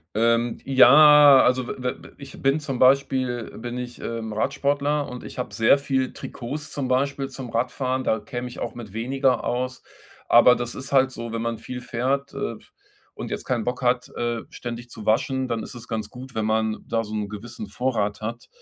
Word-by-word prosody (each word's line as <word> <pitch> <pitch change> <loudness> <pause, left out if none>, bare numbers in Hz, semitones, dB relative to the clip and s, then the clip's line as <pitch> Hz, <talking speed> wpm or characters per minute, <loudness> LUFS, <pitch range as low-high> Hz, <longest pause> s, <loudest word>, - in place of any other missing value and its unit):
Ähm, 115 +1 +2
ja, 145 +1 +8
also, 125 0 +1
we 125 -1 -3
we - - -14
ich 140 -1 -11
bin 135 +3 +3
zum 135 -4 -4
Beispiel, 130 -2 +3
bin 120 +2 -5
ich, 125 -1 -7
ähm, 115 -2 -4
Radsportler 140 +4 0
und 125 0 -8
ich - - -10
habe 125 - -4
sehr 115 +5 +5
viel 135 -2 -1
Trikots 145 +5 -7
zum 135 -3 -3
Beispiel 135 +1 0
zum 130 -2 -8
Radfahren, 130 +2 -1
da 110 - +1
käme 120 +4 -6
ich 125 - -11
auch - - -4
mit 110 -5 -9
weniger 130 +3 0
aus. 130 +1 -2 0.5
Aber 120 +1 +7
das 120 0 -4
ist 130 - -7
halt 130 -1 +4
so, 115 -1 -6
wenn 115 - -2
man 115 -1 -2
viel 125 -1 -7
fährt, 130 +4 -2
äh, - - -3
f - - -21 0.4
und - - -7
jetzt - - -4
keinen 120 -4 -1
Bock 125 +2 -3
hat, 125 0 +1
äh, 120 -1 -1
ständig 120 0 -7
zu 110 - -9
waschen, 130 +4 +1
dann 115 -2 -2
isses 120 -1 -9
ganz 110 -2 -4
gut, 130 0 -11
wenn 110 -1 -1
man 110 0 0
da 115 0 0
so 105 - -9
'n 105 -1 -2
gewissen 105 0 -8
Vorrat 105 -3 -1
hat. 115 +2 -6
125 Hz, 200 wpm, -24 LUFS, 115-135 Hz, 0.5 s, ja